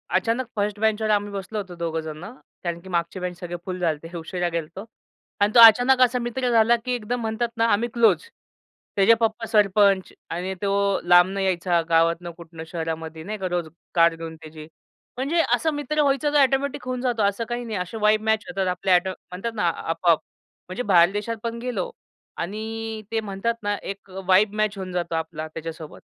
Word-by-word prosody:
अचानक 230 +7 +1
फर्स्ट 205 0 -1
बेंचवर 220 0 +1
आम्ही 205 -1 +1
बसलो 200 +2 -5
होतो 190 -4 -5
दोघं 165 -1 -2
जणं 160 +7 -8 0.3
कारण 170 -1 -3
की 190 - -12
मागचे 170 +1 -2
बेंच 180 -1 -5
सगळे 175 0 -5
फुल 185 -1 -4
झालते 165 0 -2
उशिरा 175 +2 -3
गेलतो 170 +4 -5 0.6
अन् 205 +1 +4
तो - - +8
अचानक 245 +3 +8
असा 250 0 +4
मित्र 245 +1 -2
झाला, 230 0 +5
की 235 +2 -5
एकदम 245 +1 -3
म्हणतात 225 +1 -1
ना, 230 - +3
आम्ही 230 +1 +2
क्लोज. 235 - +4 0.7
त्याचे 200 +3 +6
पप्पा 225 0 0
सरपंच 200 -2 +3 0.2
आणि 180 +3 -3
तो 200 -1 +1
लांबनं 175 +3 +5
यायचा 180 -2 +1
गावातनं 165 +1 +2
कुठनं 165 -1 -10
शहरामध्ये 160 -1 -5
नाही 215 +5 -5
का 190 -2 -3
रोज 175 -2 -2 0.3
कार 170 -1 +5
घेऊन 165 0 -7
त्याची. 155 -1 -11 0.5
म्हणजे 290 +6 +1
असं 320 -1 -1
मित्र 290 +1 -1
व्हायचं 290 +1 +1
तर - - +4
ऑटोमॅटिक 275 +1 +1
होऊन 255 -1 -2
जातो 240 -4 0
असं 200 +3 0
काही 240 0 -3
नाही 220 -3 -3
असे 180 +4 -4
वाइब 215 0 +4
मॅच 220 0 +1
होतात 195 -8 -1
आपल्या 180 +1 +2
ऑटो 180 +1 +2
म्हणतात 190 +5 -7
ना, 205 -5 +1
आपोआप. 165 0 +1 0.5
म्हणजे 185 +7 -3
बाहेर 175 -4 +5
देशात 210 +3 -3
पण 230 0 -3
गेलो 240 -7 -3 0.5
आणि 220 +3 -4
ते 225 - +1
म्हणतात 210 +2 -2
ना, 205 0 0
एक 195 0 -8 0.2
वाइब 195 +2 +4
मॅच 215 -1 0
होऊन 190 -1 -5
जातो 170 -2 -2
आपला 160 -1 -4
त्याच्यासोबत 160 0 -8
200 Hz, 185 wpm, -24 LUFS, 175-225 Hz, 0.7 s, तो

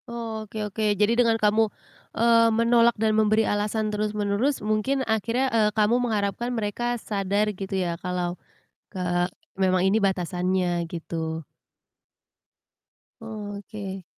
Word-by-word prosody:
Oke 220 -2 -5
oke, 210 0 0
jadi 210 +3 +3
dengan 235 -1 +3
kamu, 215 0 +3 0.5
eee, 230 0 +5
menolak 230 +1 +3
dan 220 0 +2
memberi 215 0 +3
alasan 210 +1 -1
terus-menerus 210 +5 0
mungkin 235 +6 0
akhirnya, 230 +4 0
eee, 215 -2 +4
kamu 220 +4 +3
mengharapkan 220 0 -1
mereka 240 +3 -1
sadar 205 -1 -1
gitu 195 0 -4
ya 170 -2 -2
kalau 180 -1 -2 0.6
ke 185 - -3 0.6
memang 185 -1 +2
ini 200 +3 +3
batasannya, 180 -2 0
gitu. 160 -1 -5 1.8
Oke. 205 -3 -7
210 Hz, 115 wpm, -25 LUFS, 195-225 Hz, 1.8 s, eee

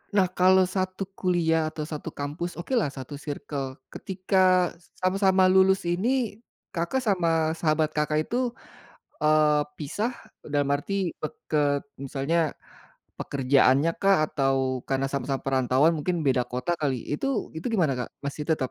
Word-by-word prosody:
Nah 190 -2 +4
kalau 185 +1 +5
1 185 +1 -1 0.2
kuliah 170 -3 +2
atau 155 0 -5
1 150 -1 -6
kampus 150 +5 -4
okelah 220 - 0
1 135 0 -7
circle 140 -2 -5 0.2
ketika 185 -1 +2 0.3
sama-sama 190 0 +3
lulus 190 +1 +4
ini, 215 +6 0 0.3
Kakak, 175 +11 -1
sama 165 -7 +2
sahabat, 155 -1 +1
Kakak 150 0 0
itu, 235 - -3 0.8
eee, 150 -1 +4
pisah 205 - -2 0.4
dalam 145 -1 +1
arti 190 +4 -2
peket 145 -2 -1 0.2
misalnya 140 +4 -1 0.8
pekerjaannya 135 +2 +3
kah 195 0 +5 0.2
atau 135 -3 +1 0.3
karena 135 0 0
sama-sama 135 -1 -2
perantauan 130 +3 +3
mungkin 175 +4 -1
beda 130 -2 +3
kota 125 +6 -3
kali 140 -4 0 0.2
itu 150 - -2 0.3
itu 160 - -5
gimana, 165 -9 +2
Kak, 125 - -3 0.2
masih 140 +1 -4
tetap 150 -6 0
155 Hz, 130 wpm, -26 LUFS, 145-185 Hz, 0.8 s, kalau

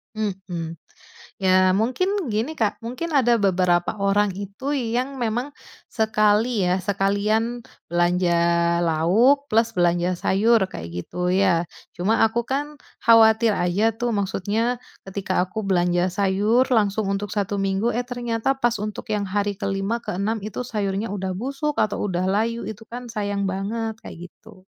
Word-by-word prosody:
Mhm. 185 -6 -4 0.6
Ya, 185 0 +4
mungkin 330 - 0
gini, 235 +9 -1
Kak, 215 -3 0
mungkin 255 +8 -4
ada 240 -4 +4
beberapa 180 0 +2
orang 200 +1 +2
itu 200 +7 -6
yang 255 +1 -2
memang 240 +5 -1 0.4
sekali, 215 0 +2
ya, 180 +1 +2
sekalian 210 +5 0 0.3
belanja 175 +1 +2 0.5
lauk, 220 - +3
plus 225 +1 +2
belanja 175 +1 +2
sayur, 220 +5 +3
kayak 85 0 -7
gitu, 180 0 -3
ya. 185 -3 +3 0.3
Cuma 210 +6 +1
aku 230 +2 0
kan 290 +2 -3 0.3
khawatir 225 -1 +6
aja 180 +5 +2
tuh. 240 +1 -2
Maksudnya, 205 +5 -1 0.3
ketika 190 -1 -1
aku 200 +3 -5
belanja 175 -1 +2
sayur 205 +5 +2
langsung 210 -1 +2
untuk 200 0 -3
1 205 -1 -1
minggu, 195 +4 0
eh, 245 0 -1
ternyata 240 0 -1
pas 240 -2 +1
untuk 210 0 -5
yang 205 -1 -1
hari 205 0 -1
ke-5, 195 +3 -1
ke-6 205 +5 -1
itu 215 +3 -4
sayurnya 205 -1 -2
udah 190 -2 -3
busuk 275 +7 -3
atau 210 0 0
udah 180 -1 -1
layu, 230 +4 0
itu 220 +1 -8
kan 245 0 -8
sayang 205 -2 -2
banget, 220 +3 -3
kayak 175 +1 -10
gitu. 210 -4 -18
210 Hz, 145 wpm, -23 LUFS, 190-230 Hz, 0.6 s, khawatir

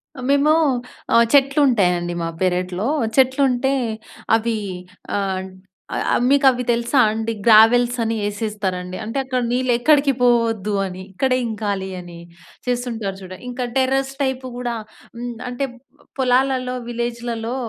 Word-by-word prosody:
అ - - -10
మేము 285 +2 +4 0.6
ఆహ్, 235 0 +6
చెట్లు 275 0 +4
ఉంటాయండి 180 -7 +1
మా 165 - -2
పెరట్లో. 180 +3 0 0.3
చెట్లు 265 +1 +4
ఉంటే 265 +2 0 0.6
అవి 230 0 -2 0.6
ఆహ్, 190 -2 -1 0.7
అ - - +4
మీకు 280 0 +4
అవి 250 -1 -1
తెలుసా 235 +3 +1
అండి 225 +1 -2
గ్రావెల్స్ 235 +2 +6
అని 225 0 -1
ఏసేస్తారండి. 200 -4 -3
అంటే 225 +5 -5
అక్కడ 255 -1 -1
నీళ్ళు 255 +1 +1
ఎక్కడికి 280 +1 +4
పోవద్దు 230 -4 +2
అని, 185 0 -7
ఇక్కడే 255 +5 +1
ఇంకాలి 205 -3 -3
అని 175 -1 -10 0.5
చేస్తుంటారు 235 -6 -2
చూడండి. 185 +3 -10
ఇంకా 250 0 -3
టెర్రస్ 270 +1 +1
టైప్ 265 -1 -2
గూడా 245 -1 -3 0.4
హ్మ్, 240 0 -5
అంటే 250 +3 -2 0.5
పొలాలలో, 255 0 +1
విలేజ్‌లలో 235 0 -3
235 Hz, 130 wpm, -21 LUFS, 205-255 Hz, 0.7 s, ఆహ్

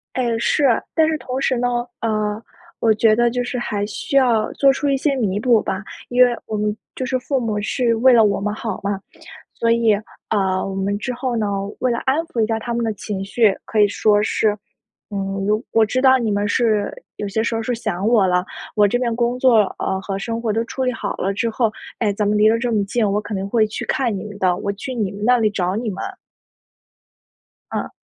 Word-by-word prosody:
诶， 240 -3 0
是， 285 +5 +1 0.3
但 320 -1 +4
是 315 - 0
同 255 -1 -4
时 260 -2 +1
呢， 245 0 0
呃， 215 -1 -1 0.4
我 225 - +4
觉 215 0 +4
得 240 +1 +3
就 245 +1 -1
是 250 0 -3
还 205 -3 -2
需 225 +6 -4
要 240 -5 +3
做 275 -1 +4
出 285 +1 -2
一 275 - +2
些 280 +1 +1
弥 205 -7 0
补 230 0 +3
吧。 190 +2 -3 0.2
因 250 +1 +5
为 245 -1 +1
我 215 - -3
们 210 0 -1 0.2
就 260 - -3
是 260 - 0
父 270 +2 -1
母 220 -4 -1
是 235 +1 +1
为 255 +3 +5
了 225 -2 +6
我 200 -1 +1
们 205 +1 -1
好 220 -1 -4
嘛， 200 -1 -2 0.5
所 230 - 0
以， 230 -1 +4 0.4
呃， 190 -3 +1
我 190 - -5
们 200 +1 -1
之 250 +3 -3
后 245 -1 -2
呢， 215 -2 0 0.3
为 255 - +1
了 235 - -1
安 265 - +3
抚 240 - -3
一 215 - +2
下 225 0 -1
他 235 +1 -4
们 235 0 -1
的 220 - 0
情 195 -1 -5
绪， 205 0 +2
可 220 - -3
以 205 - +7
说 205 +1 +2
是： 210 -1 +1 0.6
“嗯， 195 0 -2
我 215 +3 +1
我 225 -1 +4
知 255 +4 -1
道 260 -1 +6
你 225 -4 -1
们 205 0 0
是 215 -3 +1 0.2
有 205 - -4
些 200 +3 -1
时 230 +1 -1
候 225 - -1
是 245 - -2
想 215 -4 -2
我 225 -4 +4
了， 180 0 +1 0.3
我 210 -1 +4
这 245 - +1
边 235 -2 -1
工 240 +1 0
作， 250 -4 +5 0.2
呃， 190 - -1
和 195 0 -4
生 230 +3 -4
活 225 -2 0
都 225 +2 0
处 260 +3 -4
理 255 - +1
好 210 -3 -4
了 195 +2 0
之 230 +4 -1
后， 225 -1 0 0.3
哎， 210 -4 +2
咱 205 +1 -1
们 210 +1 +2
离 215 +1 +5
得 230 +1 +3
这 240 -1 -1
么 205 -2 +1
近， 215 +1 0
我 210 - +1
肯 210 -1 -5
定 195 +1 -3
会 220 +1 +3
去 215 - -4
看 240 -6 0
你 - - -6
们 205 -1 -8
的， 180 -1 +2
我 200 +2 -2
去 205 +6 -6
你 215 -6 -2
们 205 +1 -8
那 250 +1 +5
里 220 -2 +3
找 185 -2 -1
你 230 +1 -2
们。” 195 -2 -4 1.7
嗯。 - - -3
220 Hz, 255 characters per minute, -20 LUFS, 205-245 Hz, 1.7 s, 以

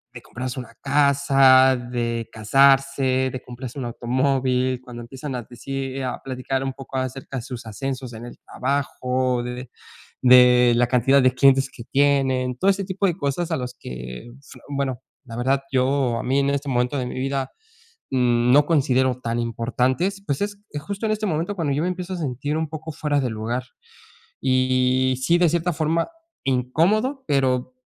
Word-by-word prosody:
de 120 - -8
comprarse 125 +2 -6
una 120 - -13
casa, 135 -2 +5
de 120 -2 -3
casarse, 135 +3 +3
de 130 - -6
comprarse 125 +2 -8
un - - -3
automóvil, 130 +1 0
cuando 125 -2 -9
empiezan 130 +3 -7
a 125 - -3
decir, 135 +2 -5
a 125 - -4
platicar 130 0 -3
un 135 - -2
poco 135 0 -10
acerca 130 +1 -4
de - - -3
sus 120 -2 -8
ascensos 125 +3 -5
en 110 +1 -9
el 120 - -10
trabajo, 130 -3 -1
de 125 - -4 0.7
de 125 0 +8 0.3
de - - +3
la 120 +1 +3
cantidad 130 +3 +4
de 130 0 +4
clientes 135 0 +4
que 115 - -11
tienen, 135 -2 +1
todo 195 +8 +3
ese 195 0 -3
tipo 195 +1 -1
de 175 -2 -1
cosas 160 +3 -2
a 160 - +1
los 125 -1 -5
que 60 - -8
s 140 - -15
bueno, 135 -3 -2 0.2
la 115 -3 -9
verdad, 135 +3 +1
yo, 130 -2 +1
a - - -4
mí 135 +2 +1
en 140 0 +1
este 140 0 -2
momento 125 +2 0
de 130 - -2
mi 125 - -5
vida, 135 0 -2 0.6
mm, 125 -1 +2
no 145 +2 +6
considero 130 -5 +2
tan 115 0 -2
importantes. 130 - -1
Pues, 140 +1 -1
es 205 0 -3 0.2
justo 200 +8 -4
en 215 - +1
este 215 0 -2
momento 170 +2 -1
cuando 160 -6 -1
yo 145 - 0
me 175 - 0
empiezo 180 0 -5
a - - -5
sentir 145 0 -3
un 160 -1 -2
poco 155 +1 -7
fuera 145 -1 -1
de 130 -2 -1
lugar 115 +3 -3 0.8
y, 130 0 +2
sí, 170 +4 +4
de 175 -1 +4
cierta 170 +2 0
forma, 160 +1 0 0.4
incómodo, 170 - +1
pero 130 -2 +1
130 Hz, 180 wpm, -23 LUFS, 125-145 Hz, 0.8 s, de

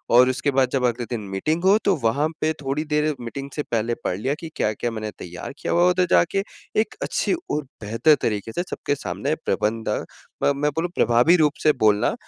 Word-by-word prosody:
और 125 +1 +7
उसके 140 +2 0
बाद 130 -1 +2
जब 135 -2 0
अगले 120 0 0
दिन 120 -3 -3
मीटिंग 155 - -1
हो 195 +2 +6
तो 195 - +4
वहाँ 140 +7 +2
पे 155 - +2
थोड़ी 140 +3 -1
देर 150 0 +1
मीटिंग 135 +4 -6
से 150 - -2
पहले 115 -1 -1
पढ़ 90 - -1
लिया 130 +7 -1
कि 165 - -7
क्या-क्या 110 +3 -1
मैंने 110 -1 -4
तैयार 90 +10 -7
किया - - -2
हुआ 175 - +4
है? 180 - +6
उधर 180 0 +2
जाके 195 +3 +3 0.4
एक 220 - -5
अच्छी - - 0 0.2
और 150 - 0 0.2
बेहतर 115 +9 +3
तरीके 105 0 -1
से 175 - -2
सबके 145 - -2
सामने 145 +1 -2
प्रबंध 110 +1 0 0.5
म - - +4
मैं 150 +2 +1
बोलूँ 175 +2 -1
प्रभावी 120 +9 +4
रूप 150 -2 +3
से 155 - +6
बोलना। 105 -1 +4
135 Hz, 210 wpm, -23 LUFS, 115-155 Hz, 0.5 s, और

